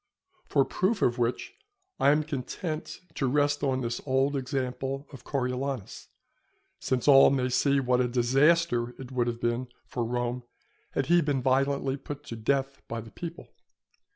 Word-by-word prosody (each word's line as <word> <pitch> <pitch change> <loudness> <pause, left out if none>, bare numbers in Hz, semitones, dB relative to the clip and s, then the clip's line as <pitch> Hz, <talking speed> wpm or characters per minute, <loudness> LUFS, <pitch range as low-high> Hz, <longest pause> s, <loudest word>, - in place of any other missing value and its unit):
For 140 -2 +3
proof 200 +4 0
of 120 +1 +2
which 120 - -1 0.5
I - - +5
am 150 +1 +3
content 155 +3 -5
to 135 - -1
rest 145 +2 +2
on 130 -2 0
this 120 -1 -3
old 135 +1 +1
example 135 0 -3
of 130 - -11
Coriolanus, 130 -3 -3 0.7
since 130 0 -1
all 135 -1 +8
may 130 -2 +1
see 140 +2 +2
what 125 -1 +2
a 125 - +2
disaster 125 +1 +2
it 130 -1 -8
would 125 -2 0
have 115 -1 -2
been 120 +2 -1 0.2
for 120 - -3
Rome 120 +1 -2 0.5
had 135 - 0
he 175 +4 +4
been 145 -4 0
violently 135 +1 +1
put 145 +1 -8
to 120 - -7
death 135 +4 -1
by 115 - -4
the 115 -1 -10
people. 170 -1 -8
135 Hz, 160 wpm, -28 LUFS, 125-140 Hz, 0.7 s, all